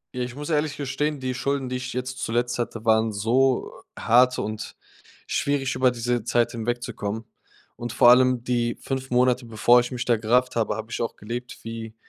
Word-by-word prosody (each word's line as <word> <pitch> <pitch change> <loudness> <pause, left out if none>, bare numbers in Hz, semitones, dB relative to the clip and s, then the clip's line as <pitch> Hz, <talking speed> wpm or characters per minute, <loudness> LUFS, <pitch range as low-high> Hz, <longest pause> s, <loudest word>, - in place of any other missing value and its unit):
Ja, 125 - -2
ich 125 0 -4
muss 150 +3 -5
ehrlich 150 -1 0
gestehen, 145 +2 -2
die 130 -1 -2
Schulden, 140 0 -2
die 125 - -2
ich 130 0 -5
jetzt 130 +1 -4
zuletzt 120 +2 -1
hatte, 115 -1 -4
waren 110 0 +3
so 125 +6 +1 0.2
hart 125 +2 +4
und 110 0 -5 0.5
schwierig, 140 -2 0
über 130 0 +3
diese 120 -1 -1
Zeit 120 +1 +1
hinwegzukommen. 115 -2 -3 0.5
Und 120 -1 -5
vor 120 - +6
allem 125 -1 +4
die 120 -1 0
5 135 0 -4
Monate, 125 0 +2
bevor 115 +2 +5
ich 120 0 -2
mich 125 -1 -3
da 120 - +3
gerafft 125 +4 +1
habe, 115 -2 0
habe 110 +1 -7
ich - - -3
auch 115 - -2
gelebt 120 +4 -6
wie 115 -1 -7
125 Hz, 190 wpm, -24 LUFS, 115-130 Hz, 0.5 s, vor